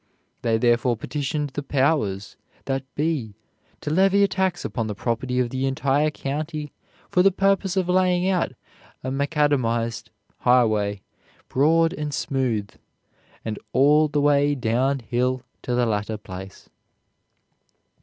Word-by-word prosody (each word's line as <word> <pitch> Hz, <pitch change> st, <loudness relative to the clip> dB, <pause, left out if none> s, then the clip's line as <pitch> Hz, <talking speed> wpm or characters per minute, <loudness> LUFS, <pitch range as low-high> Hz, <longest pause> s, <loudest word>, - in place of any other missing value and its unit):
They 115 Hz, -1 st, +2 dB
therefore 120 Hz, +1 st, +2 dB
petitioned 145 Hz, +3 st, -3 dB
the 145 Hz, -, -4 dB
Powers 135 Hz, -9 st, 0 dB, 0.3 s
that 135 Hz, -1 st, -1 dB
be 145 Hz, -9 st, -1 dB, 0.5 s
to 150 Hz, -, -3 dB
levy 195 Hz, +4 st, +4 dB
a -, -, +5 dB
tax 190 Hz, -2 st, -1 dB
upon 115 Hz, -3 st, -2 dB
the 105 Hz, -, -4 dB
property 125 Hz, +3 st, -1 dB
of 120 Hz, -2 st, 0 dB
the 130 Hz, +1 st, -1 dB
entire 135 Hz, +3 st, +1 dB
county 150 Hz, +1 st, -4 dB, 0.4 s
for 180 Hz, -, +4 dB
the 195 Hz, -, +6 dB
purpose 195 Hz, 0 st, +1 dB
of 185 Hz, -2 st, +1 dB
laying 180 Hz, 0 st, +2 dB
out 185 Hz, -2 st, +1 dB, 0.5 s
a 130 Hz, -, -3 dB
macadamized 135 Hz, -5 st, 0 dB, 0.3 s
highway, 110 Hz, -5 st, +2 dB, 0.5 s
broad 165 Hz, +5 st, +3 dB
and 150 Hz, -4 st, -4 dB
smooth, 125 Hz, -8 st, -1 dB, 0.7 s
and 110 Hz, -2 st, -3 dB
all 150 Hz, +3 st, +5 dB
the 145 Hz, 0 st, 0 dB
way 145 Hz, 0 st, +3 dB
down 130 Hz, +3 st, +1 dB
hill 125 Hz, +2 st, -1 dB, 0.2 s
to 125 Hz, -, -2 dB
the 125 Hz, 0 st, +2 dB
latter 105 Hz, 0 st, -1 dB
place." 95 Hz, -1 st, -10 dB
135 Hz, 135 wpm, -24 LUFS, 120-155 Hz, 0.7 s, the